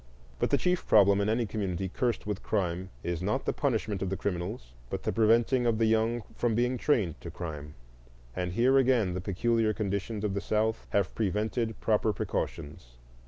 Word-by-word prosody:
But -, -, +1 dB
the -, -, +3 dB
chief 180 Hz, 0 st, 0 dB
problem 100 Hz, -1 st, +5 dB
in 100 Hz, -, +1 dB
any 115 Hz, +2 st, +1 dB
community 95 Hz, -4 st, -2 dB
cursed 120 Hz, +5 st, -1 dB
with 105 Hz, -2 st, -3 dB
crime 95 Hz, -3 st, -1 dB
is 85 Hz, -1 st, -2 dB
not 105 Hz, +8 st, -1 dB
the -, -, 0 dB
punishment 110 Hz, -7 st, -1 dB
of 95 Hz, -, -1 dB
the 95 Hz, -, -2 dB
criminals, 90 Hz, -, -4 dB, 0.2 s
but -, -, -4 dB
the -, -, -1 dB
preventing 115 Hz, +3 st, +3 dB
of 115 Hz, -2 st, +2 dB
the 115 Hz, -, +3 dB
young 110 Hz, +1 st, +1 dB
from 120 Hz, -2 st, 0 dB
being 125 Hz, +2 st, +1 dB
trained 100 Hz, -, +1 dB
to -, -, -7 dB
crime. 75 Hz, -3 st, -7 dB, 0.6 s
And 90 Hz, -1 st, -2 dB
here 130 Hz, +6 st, +4 dB
again 120 Hz, -8 st, +2 dB
the 90 Hz, -, -3 dB
peculiar 110 Hz, +3 st, +1 dB
conditions 100 Hz, +1 st, -2 dB
of 105 Hz, -2 st, 0 dB
the 100 Hz, -, -2 dB
South 110 Hz, +2 st, 0 dB
have 100 Hz, -3 st, 0 dB
prevented 110 Hz, +2 st, -1 dB
proper 110 Hz, 0 st, +2 dB
precautions. 70 Hz, -10 st, -4 dB
105 Hz, 185 wpm, -29 LUFS, 95-115 Hz, 0.6 s, problem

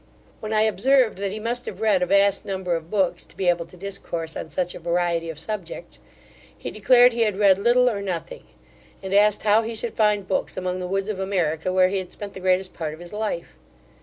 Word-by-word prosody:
When 215 Hz, -, -6 dB
I 215 Hz, -1 st, +3 dB
observed, 225 Hz, +2 st, +2 dB
that 200 Hz, -1 st, -2 dB
he 215 Hz, -, -5 dB
must 240 Hz, +3 st, -3 dB
have 190 Hz, -, -6 dB
read 215 Hz, -4 st, +2 dB
a 180 Hz, -, +1 dB
vast 200 Hz, +1 st, +3 dB
number 190 Hz, -3 st, -2 dB
of 165 Hz, 0 st, -6 dB
books 195 Hz, -3 st, 0 dB
to -, -, -18 dB
be 190 Hz, -, -1 dB
able 170 Hz, -1 st, 0 dB
to 180 Hz, -, -15 dB
discourse 170 Hz, -4 st, -4 dB
on -, -, -6 dB
such 175 Hz, +4 st, -2 dB
a -, -, -9 dB
variety 170 Hz, -1 st, -1 dB
of 160 Hz, -, -6 dB
subjects, 180 Hz, +2 st, -6 dB, 0.6 s
he -, -, -6 dB
declared 245 Hz, +3 st, +5 dB
he 235 Hz, -, -1 dB
had 210 Hz, -4 st, +1 dB
read 195 Hz, -2 st, +5 dB
little 240 Hz, +4 st, +4 dB
or 210 Hz, -5 st, 0 dB
nothing, 200 Hz, -, -5 dB, 0.6 s
and 190 Hz, 0 st, -4 dB
asked 205 Hz, +1 st, +4 dB
how 215 Hz, +1 st, +4 dB
he 225 Hz, 0 st, -5 dB
should 225 Hz, +1 st, -3 dB
find 210 Hz, -3 st, +1 dB
books 190 Hz, -, -2 dB
among 185 Hz, 0 st, -2 dB
the 180 Hz, -, -4 dB
woods 195 Hz, +2 st, -2 dB
of 205 Hz, -3 st, -3 dB
America, 180 Hz, -3 st, -1 dB
where 185 Hz, 0 st, +4 dB
he 195 Hz, 0 st, -1 dB
had 180 Hz, -1 st, -8 dB
spent 205 Hz, -1 st, -8 dB
the -, -, -8 dB
greatest 185 Hz, 0 st, +1 dB
part 155 Hz, -2 st, -4 dB
of -, -, -18 dB
his 175 Hz, +2 st, -11 dB
life. 210 Hz, -5 st, -3 dB
195 Hz, 230 wpm, -23 LUFS, 180-215 Hz, 0.6 s, declared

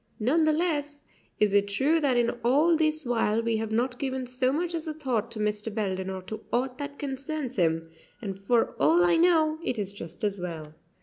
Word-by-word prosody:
None 290 Hz, +9 st, +3 dB
the 310 Hz, -, +4 dB
less 295 Hz, -3 st, -1 dB, 0.4 s
is 210 Hz, -2 st, +3 dB
it 200 Hz, 0 st, +4 dB
true 270 Hz, +11 st, +2 dB
that 275 Hz, -5 st, +2 dB
in 235 Hz, -1 st, +3 dB
all 295 Hz, +8 st, +4 dB
this 310 Hz, -1 st, +1 dB
while 230 Hz, -2 st, +1 dB
we 230 Hz, -1 st, +1 dB
have 220 Hz, 0 st, -3 dB
not 245 Hz, +3 st, 0 dB
given 260 Hz, -1 st, -2 dB
so 255 Hz, +1 st, 0 dB
much 340 Hz, +4 st, -1 dB
as 325 Hz, -1 st, -3 dB
a 310 Hz, -, -3 dB
thought 250 Hz, -7 st, -1 dB
to 230 Hz, -2 st, -8 dB
Mr. 210 Hz, +1 st, -1 dB
Belden 190 Hz, -3 st, -2 dB
or 190 Hz, -1 st, -5 dB
to 215 Hz, +3 st, -7 dB
aught 250 Hz, +1 st, -1 dB
that 285 Hz, 0 st, -5 dB
concerns 275 Hz, -1 st, -4 dB
him; 165 Hz, -3 st, +1 dB, 0.3 s
and 195 Hz, -4 st, -5 dB
for 225 Hz, +5 st, +1 dB
all 345 Hz, +2 st, +5 dB
I 350 Hz, -1 st, +4 dB
know 320 Hz, -2 st, +3 dB
it 250 Hz, -, -2 dB
is 200 Hz, -2 st, -3 dB
just 170 Hz, -3 st, -9 dB
as 200 Hz, -2 st, 0 dB
well. 160 Hz, -4 st, -6 dB
250 Hz, 210 wpm, -27 LUFS, 210-300 Hz, 0.4 s, all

